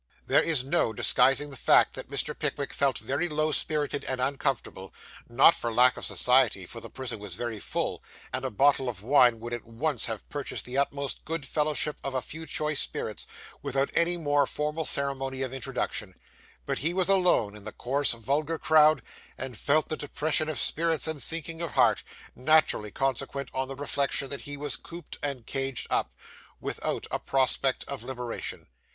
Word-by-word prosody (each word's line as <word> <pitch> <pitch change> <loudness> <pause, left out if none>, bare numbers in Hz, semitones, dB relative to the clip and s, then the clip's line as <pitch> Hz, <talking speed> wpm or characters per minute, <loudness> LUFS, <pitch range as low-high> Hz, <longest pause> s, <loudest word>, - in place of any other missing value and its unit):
There - - +4
is 155 -6 +3
no 135 -5 +1
disguising 135 +6 +3
the - - -7
fact - - +5
that - - -8
Mr. - - -1
Pickwick 140 -1 -3
felt 140 -2 +1
very 150 +6 -2
low 155 +1 +1
spirited 150 -1 0
and 130 -1 -2
uncomfortable 130 -7 -2 0.3
not 135 +7 +7
for 120 - -3
lack 125 +2 +5
of - - -6
society, 125 -7 +3
for 115 +5 -9
the - - -9
prison 130 -4 -5
was 100 -4 -6
very 120 -1 -4
full, - - -3 0.3
and 130 - -2
a 130 - -1
bottle 135 +2 +3
of 100 -4 -7
wine 125 -2 +5
would 120 +1 -6
at 120 - -4
once 120 +3 0
have 110 -3 -5
purchased 140 -3 -5
the 125 - -6
utmost 140 0 -1
good 165 -3 -4
fellowship 150 +1 0
of 135 -1 -4
a 130 - +1
few 160 +1 -7
choice 150 -1 0
spirits, - - -3 0.3
without 135 0 0
any 175 +1 +2
more 145 -3 +2
formal 150 +2 -2
ceremony 135 -2 -1
of 130 -1 -4
introduction; 125 -7 -3 0.5
but - - -2
he 165 +5 -1
was 185 -1 +2
alone 180 - +3
in 105 - -9
the 110 - -6
coarse, 140 +2 +1
vulgar 145 +8 -1
crowd, 155 -5 +5 0.3
and 130 -1 -5
felt 150 +7 +2
the 155 - -1
depression 155 +1 0
of 155 - -3
spirits 165 0 +2
and 160 -3 -2
sinking 165 0 -1
of 170 - -4
heart, - - +4 0.3
naturally 150 -6 +3
consequent 135 +3 -2
on 130 0 -1
the 135 - -6
reflection 140 -1 -1
that 140 - -5
he 145 0 -6
was 145 0 -2
cooped 170 -1 -10
and 140 -5 -3
caged 135 -2 -2
up, - - +1 0.5
without - - -3
a - - -1
prospect 135 0 +1
of 140 -1 -5
liberation. 125 -2 -5
140 Hz, 180 wpm, -28 LUFS, 125-150 Hz, 0.5 s, not